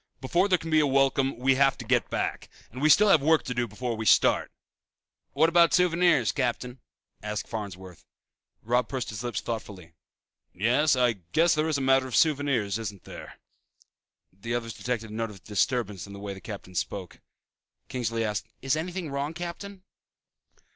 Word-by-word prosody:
Before 170 +9 +1
there 185 -2 +3
can 165 -1 -7
be 155 - +5
a 150 - +3
welcome 135 -1 +2
we 130 +2 +3
have 135 0 +3
to - - -8
get - - +1
back. - - -3 0.2
And 125 +3 -8
we 155 - +4
still 210 +6 +6
have 155 - +5
work 160 +2 +3
to 125 - -4
do 120 0 -1
before 115 +3 -4
we 110 0 -4
start." - - +4 0.8
"What 155 +3 +4
about 170 0 +4
souvenirs, 170 - +3
Captain?" 125 0 -3 0.4
asked 105 0 -4
Farnsworth. 95 -5 -7 0.6
Robb 120 +2 +1
pursed 130 -3 -3
his 105 +2 -6
lips 120 -1 -3
thoughtfully, 100 -7 -7 0.6
"Yes, 125 +10 +3
I 125 -2 +3 0.2
guess 165 +2 +4
there 155 +1 0
is 155 - +1
a - - -3
matter 135 0 +3
of 125 - -4
souvenirs, 135 - +1
isn't 105 -3 -6
there." - - -11 1.0
The 115 +5 -4
others 115 -1 -4
detected 115 -3 -4
a - - -8
note 115 +1 -2
of 95 -4 -13
disturbance 105 -2 -1
in 100 - -10
the 100 - -9
way 100 -1 -5
the 95 - -11
captain 100 -3 -9
spoke. 90 +1 -4 0.7
Kingsley 115 -3 -2
asked, 105 -2 -3 0.2
"Is 135 +1 +1
anything 175 0 -4
wrong, 140 +3 -3
Captain?" 185 +3 -7
125 Hz, 180 wpm, -27 LUFS, 110-150 Hz, 1.0 s, still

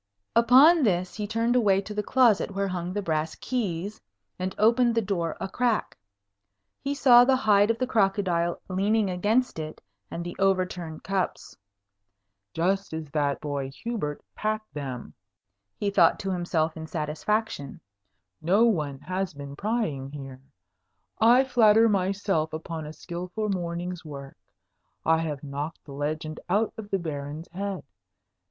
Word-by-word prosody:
Upon 265 +9 +7
this, 185 -7 +1
he 210 -1 -4
turned 230 +3 +1
away 205 -6 +4
to 210 +1 -7
the 210 - -1
closet 220 -4 +3
where 200 0 0
hung 180 -1 -3
the 205 +2 -3
brass 160 -2 -1
keys, 205 -5 -3 0.4
and 185 +1 -3
opened 235 +2 +4
the 230 - +3
door 175 -4 -2
a - - -3
crack. 235 +2 0 0.9
He 280 +1 -1
saw 245 -4 +7
the 265 +1 +4
hide 210 -5 +4
of 230 - +2
the 255 - 0
crocodile 195 -7 +1
leaning 200 +2 +1
against 210 +4 +1
it, 155 0 -6 0.3
and 170 - -5
the 175 - -6
overturned 185 -4 0
cups. 195 -1 -2 1.0
"Just 190 - 0
as 160 -2 -5
that 145 -2 0
boy 140 -2 -3
Hubert 150 - -5
packed 215 -4 -3
them," 135 -4 -6 0.6
he 200 -1 -1
thought - - +4
to 195 -2 -2
himself 170 -3 0
in 160 0 -7
satisfaction; 155 +1 -2 0.6
"no 195 +8 +4
one 150 -11 0
has 185 -2 -3
been 140 0 -8
prying 200 - -2
here. 135 -2 -9 0.8
I 240 +4 +6
flatter 225 -3 +5
myself 195 -5 0
upon 160 0 -5
a 155 - -8
skilful 180 +6 -5
morning's 175 -1 -3
work. 140 -3 -9 0.7
I 160 0 +4
have 150 -4 -3
knocked 145 +3 -5
the 140 - -10
legend 155 +2 -3
out 210 +4 +1
of 220 -2 -8
the 195 - +1
Baron's 150 -1 -6
head. 195 +1 -4
185 Hz, 145 wpm, -26 LUFS, 155-215 Hz, 1.0 s, Upon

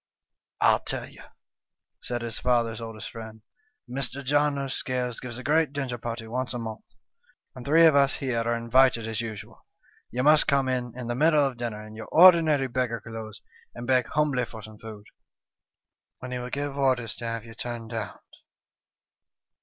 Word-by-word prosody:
' - - -31
I'll - - +5
tell - - -4
you,' - - -15 0.8
said 120 -1 -4
his 115 -2 -4
father's 115 -3 +1
oldest 115 -1 -7
friend. 110 -1 -10 0.2
' 290 - -46
Mr. 135 +2 -3
John 145 +1 +2
o' 140 0 -2
Scales 125 -2 -2
gives 120 -2 -7
a 130 - -8
great 150 +1 +2
dinner 130 -4 -3
party 115 -1 -5
once 125 +3 -3
a - - -1
month, 110 -2 -6 0.7
and 125 - -9
three 160 +5 +5
of 160 -3 +6
us 140 0 +4
here 130 -4 -1
are 120 +1 0
invited 115 0 +3
as 115 +1 -2
usual. 110 -3 -8 0.5
You 125 +2 -2
must 150 +1 +5
come 140 -1 +2
in 125 -2 -2
in 125 - -5
the 120 - -2
middle 150 +2 +4
of 135 -3 -3
dinner 110 -3 -5
in 110 - -11
your 110 0 -8
ordinary 160 -6 +6
beggar 125 -2 -1
clothes 110 -1 -9 0.3
and 120 - -6
beg 125 -1 +2
humbly 145 -5 +1
for 110 -2 -11
some 110 -1 -12
food, 110 -2 -10 1.1
when 125 - -8
he 125 - -2
will 125 0 -5
give 145 +1 -3
orders 125 -5 +1
to 120 - -6
have 115 -1 -3
you 115 - -11
turned 115 0 -6
out. 115 - -5
125 Hz, 185 wpm, -26 LUFS, 115-135 Hz, 1.1 s, of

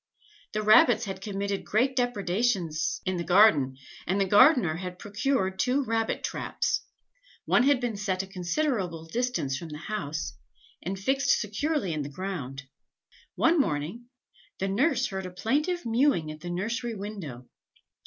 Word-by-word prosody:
The 215 0 -1
rabbits 215 +1 +6
had 190 -1 -6
committed 200 -1 -3
great 255 +5 +1
depredations 195 - 0
in 185 -1 -1
the 170 - -2
garden, 165 -8 +5 0.3
and 190 +3 +1
the 195 - +3
gardener 205 - +5
had 180 0 -6
procured 205 -2 -1
two 260 +6 +2
rabbit 225 -2 -1
traps; - - -1 0.6
one - - +4
had 275 0 +4
been 240 -3 -2
set 195 -2 -1
a - - -7
considerable 185 - -2
distance 225 - -1
from 170 - -8
the 150 - -7
house, 160 -3 -4 0.5
and 190 +3 -4
fixed 270 +8 +2
securely 210 - -1
in 155 - -2
the 140 - -5
ground. 140 -5 -5 0.7
One 325 0 +3
morning, 165 - -1 0.5
the 195 - -1
nurse 260 +6 +2
heard 190 -6 -4
a - - -9
plaintive 295 - -1
mewing 230 - +2
at 155 - -9
the 175 - -7
nursery 230 +6 -2
window. 185 - -7
195 Hz, 150 wpm, -27 LUFS, 175-245 Hz, 0.7 s, rabbits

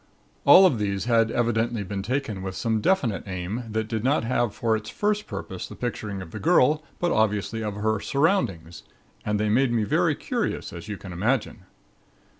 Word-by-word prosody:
All 180 +7 +9
of 135 -12 +3
these 100 -1 -1
had 115 -2 +3
evidently 115 -1 0
been 100 0 -4
taken 115 -2 -2
with 95 0 -5
some 110 -2 0
definite 120 - +1
aim 95 +6 -4
that 110 0 -2
did 110 -1 -3
not 140 +2 +2
have 120 -1 0
for 115 +1 0
its 110 0 -5
first 210 0 -1
purpose 95 -3 -6
the - - -10
picturing 105 -5 -4
of 80 - -12
the - - -6
girl, 155 -2 +3
but 175 -1 0
obviously 110 +1 0
of 105 -2 -3
her 110 +1 0
surroundings 140 - 0 0.4
and 105 -1 -1
they 105 - +1
made 120 +4 +3
me 115 -2 +1
very 105 - +2
curious, - - -3
as 85 +4 -8
you 105 -2 -5
can 95 -2 -9
imagine. 105 0 -1
110 Hz, 190 wpm, -25 LUFS, 100-125 Hz, 0.4 s, All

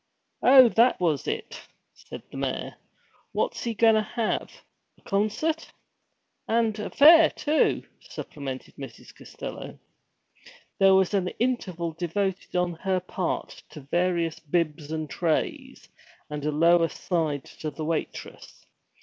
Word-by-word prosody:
'Oh, 260 0 +8
that 235 +3 +3
was 160 -6 0
it?' 445 0 -4 0.3
said - - -11
the - - -8
mayor. - - -3 0.6
'What's - - -1
he 230 -1 -2
goin' 225 +1 +5
to 215 - +3
have 220 +2 -2 0.5
a - - -27
concert?' 215 +11 -1 0.4
' - - -49 0.3
And 225 -2 +1
a 210 - -4
fair, 320 +2 +8
too!' 305 +1 +1 0.2
supplemented 135 -3 -8
Mrs. 135 -4 -10
Costello. - - -8 1.0
There 195 0 +6
was 190 +1 +2
an 190 -3 +1
interval 185 -9 -1
devoted 180 +4 -3
on 180 -1 +1
her 190 +2 0
part 180 0 -4
to 150 - -10
various 170 +2 0
bibs 155 -1 -2
and 155 -1 -3
trays, 160 +2 -2 0.4
and 150 -1 -4
a 150 - +1
low 170 +3 +4
aside 160 -4 -1
to 155 - -3
the 155 +1 -6
waitress. 160 0 -5
180 Hz, 130 wpm, -26 LUFS, 160-220 Hz, 1.0 s, Oh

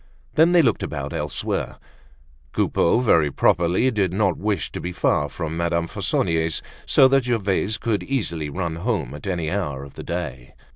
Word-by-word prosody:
Then, 165 +3 +5
they 175 -2 +6
looked 125 - +2
about - - -4
elsewhere. - - -3 0.8
Coupeau, 100 +8 +2
very 80 -11 +4
properly 90 - +2
did 100 -6 0
not 95 -2 +1
wish 105 0 -2
to - - -6
be 90 - -4
far 75 -4 +1
from 80 -1 -4
Madame 85 0 0
Fauconnier's 80 0 0 0.2
so 135 - +6
that 135 -1 +3
Gervaise 105 -3 0
could 105 -2 -1
easily 85 - -2
run 85 +1 -3
home 95 - -2
at 75 +6 -8
any 85 -4 -1
hour 75 -9 -2
of 70 - -11
the - - -8
day. 65 -8 -5
90 Hz, 165 wpm, -23 LUFS, 80-110 Hz, 0.8 s, they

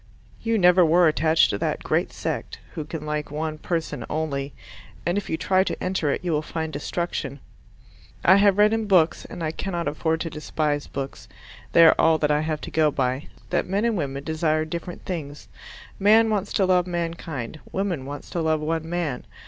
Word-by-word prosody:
"You 225 -1 +1
never 180 -1 +6
were 170 +1 +5
attached 155 +1 +3
to 100 - -2
that - - -2
great - - 0
sect" - - -4 0.2
who 155 - -5
can 155 0 -6
like 150 0 -3
one 155 +1 -3
person 165 0 -3
only, 145 -3 -2 0.5
and 175 - +1
if 205 - -3
you 160 - -1
try 190 +2 +2
to - - -4
enter 185 -5 0
it 140 - -1
you 175 - -1
will 150 -1 +1
find 160 0 -4
destruction. 150 -1 -3 0.9
I 190 +2 +7
have 200 -1 +4
read 210 +1 +5
in 225 -1 -1
books 175 -5 +3
and 170 - -7
I 155 - 0
cannot 175 0 -3
afford 160 +1 -1
to 165 - -2
despise 150 -1 -2
books, 135 0 -6 0.5
they 170 - +8
are 160 - +8
all 160 0 +5
that 150 -1 +1
I 150 0 +2
have 155 -1 -2
to - - -7
go 155 -1 +3
by 130 0 -1 0.2
that 180 - +1
men 200 +4 +1
and 230 -2 +1
women 140 -5 -3
desire 155 0 0
different 170 +2 -6
things. 150 -5 -5 0.5
Man 220 +3 +5
wants 205 -1 -1
to 195 - +3
love 180 -1 +3
mankind; 165 -6 -4
woman 180 -9 -2
wants 145 +1 -8
to 170 - -1
love 160 -1 +1
one 160 +1 -2
man. 165 -7 -2
160 Hz, 195 wpm, -24 LUFS, 150-180 Hz, 0.9 s, they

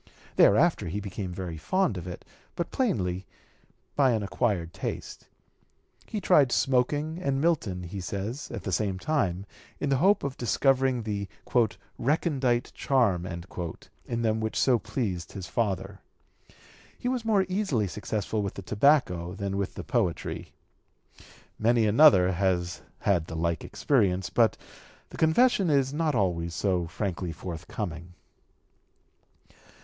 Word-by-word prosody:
Thereafter 135 - +4
he 95 +5 -3
became 100 -2 -5
very 90 -2 -5
fond 185 - +1
of 90 -1 -6
it, 90 - -8 0.3
but 170 - -3
plainly 95 - -1 0.7
by 135 -4 +4
an 110 -2 0
acquired 95 -5 -1
taste. - - -6 0.8
He 215 - -3
tried 150 -9 +4
smoking 145 +6 +1
and 135 -5 0
Milton, 125 - 0
he 95 +3 -6
says, 100 +9 -4
at - - -6
the 95 - -3
same 95 0 0
time, 95 - -1 0.3
in 145 - -1
the 135 - +3
hope 200 +4 +4
of 140 -1 -3
discovering 130 +1 +2
the 100 -2 -3 0.7
"recondite 135 -4 +1
charm" 105 -10 +1
in 85 +6 -6
them 110 -1 +1
which 110 0 -2
so 125 -3 +4
pleased 105 - -3
his 95 -3 -6
father. 95 -2 -2 1.0
He - - -4
was 250 -2 -1
more 210 -4 +3
easily 185 - 0
successful 105 +2 -2
with 100 -2 -3
the 100 - -7
tobacco 100 - +2
than 100 0 -3
with 100 -1 -2
the - - -6
poetry. 100 -9 -2 1.1
Many 115 +1 +3
another 105 -5 +6
has 90 -1 0 0.2
had 90 -5 +1
the 80 - -6
like 85 +1 -1
experience, 95 -9 +1
but - - +3 0.5
the - - -10
confession 195 +4 +4
is 135 -2 +2
not 155 -2 0
always 85 -5 0
so 90 -2 0
frankly 90 0 -3
forthcoming. 85 0 -6
105 Hz, 135 wpm, -27 LUFS, 90-140 Hz, 1.1 s, another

